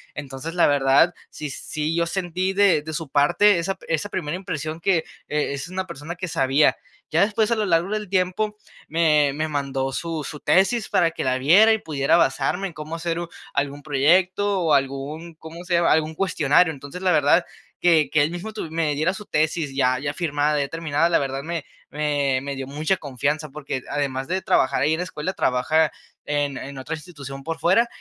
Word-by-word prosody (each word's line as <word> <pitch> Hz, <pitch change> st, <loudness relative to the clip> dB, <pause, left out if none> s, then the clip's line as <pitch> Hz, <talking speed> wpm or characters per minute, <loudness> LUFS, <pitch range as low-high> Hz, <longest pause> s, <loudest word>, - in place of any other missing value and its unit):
Entonces, 145 Hz, +4 st, -6 dB
la 175 Hz, -, +4 dB
verdad, 145 Hz, +4 st, +4 dB, 0.2 s
sí 150 Hz, -1 st, -6 dB
sí 155 Hz, +3 st, -3 dB
yo 170 Hz, 0 st, +2 dB
sentí 185 Hz, +1 st, -2 dB
de 195 Hz, -6 st, +4 dB
de 160 Hz, +1 st, -7 dB
su 160 Hz, -3 st, -4 dB
parte 175 Hz, +7 st, +4 dB
esa 190 Hz, +3 st, -2 dB
esa 165 Hz, +5 st, -1 dB
primera 165 Hz, -4 st, -3 dB
impresión 155 Hz, -3 st, -5 dB
que, 180 Hz, -1 st, +2 dB, 0.3 s
eh, 150 Hz, -1 st, -1 dB
es 140 Hz, +4 st, -5 dB
una 185 Hz, +1 st, -4 dB
persona 170 Hz, 0 st, -7 dB
que 185 Hz, +1 st, -5 dB
sabía. 135 Hz, +1 st, +3 dB, 0.3 s
Ya 165 Hz, +4 st, +2 dB
después 220 Hz, +2 st, +1 dB
a -, -, +4 dB
lo 215 Hz, -1 st, 0 dB
largo 170 Hz, +1 st, +2 dB
del 210 Hz, -3 st, -3 dB
tiempo, 195 Hz, +3 st, 0 dB, 0.3 s
me 150 Hz, -3 st, +3 dB
me 155 Hz, +2 st, -2 dB
mandó 135 Hz, -2 st, -2 dB
su 165 Hz, -1 st, -3 dB
su 150 Hz, -, -7 dB
tesis 195 Hz, +4 st, +2 dB
para 170 Hz, -2 st, +3 dB
que -, -, -4 dB
la 130 Hz, 0 st, +1 dB
viera, 185 Hz, +12 st, +6 dB
y -, -, +2 dB
pudiera 155 Hz, 0 st, +1 dB
basarme 175 Hz, +5 st, +1 dB
en 170 Hz, -, -10 dB
cómo 155 Hz, +2 st, -6 dB
hacer 165 Hz, 0 st, -2 dB
u 170 Hz, 0 st, -5 dB, 0.2 s
algún 140 Hz, 0 st, -2 dB
proyecto 185 Hz, +8 st, +2 dB
o 160 Hz, -3 st, +2 dB
algún, 140 Hz, +5 st, -1 dB
¿cómo 165 Hz, +2 st, -10 dB
se 175 Hz, -1 st, 0 dB
llama?, 170 Hz, 0 st, +3 dB
algún 160 Hz, 0 st, 0 dB
cuestionario. 165 Hz, -2 st, +2 dB
Entonces, 140 Hz, +6 st, -9 dB
la 185 Hz, -2 st, +2 dB
verdad 155 Hz, +4 st, +4 dB, 0.3 s
que 165 Hz, -4 st, +4 dB
que 150 Hz, -2 st, +3 dB
él 155 Hz, -, 0 dB
mismo 175 Hz, +5 st, -6 dB
tu 210 Hz, -7 st, -6 dB
me 160 Hz, -2 st, 0 dB
diera 155 Hz, +6 st, 0 dB
su 210 Hz, 0 st, -9 dB
tesis 155 Hz, -2 st, 0 dB
ya 130 Hz, -2 st, +2 dB
ya 145 Hz, 0 st, -3 dB
firmada, 150 Hz, -2 st, 0 dB
ya 140 Hz, -, 0 dB
terminada, 165 Hz, 0 st, 0 dB
la -, -, +3 dB
verdad 135 Hz, 0 st, -3 dB
me 165 Hz, -2 st, -4 dB, 0.3 s
me 145 Hz, -3 st, 0 dB
me 140 Hz, 0 st, -5 dB
dio 135 Hz, -1 st, -5 dB
mucha 155 Hz, +7 st, 0 dB
confianza, 150 Hz, +2 st, -2 dB
porque 140 Hz, -2 st, -4 dB
el 130 Hz, -, -8 dB
además 135 Hz, -2 st, -2 dB
de 185 Hz, +1 st, -1 dB
trabajar 130 Hz, 0 st, +2 dB
ahí 150 Hz, +3 st, +2 dB
en -, -, 0 dB
la -, -, 0 dB
escuela, 170 Hz, 0 st, -4 dB
trabaja 155 Hz, +5 st, +2 dB, 0.3 s
en 145 Hz, -2 st, -1 dB
en 140 Hz, 0 st, -7 dB
otra 150 Hz, +5 st, -4 dB
institución 145 Hz, -5 st, -9 dB
por 165 Hz, 0 st, -3 dB
fuera 190 Hz, +9 st, +3 dB
155 Hz, 205 wpm, -23 LUFS, 145-175 Hz, 0.3 s, viera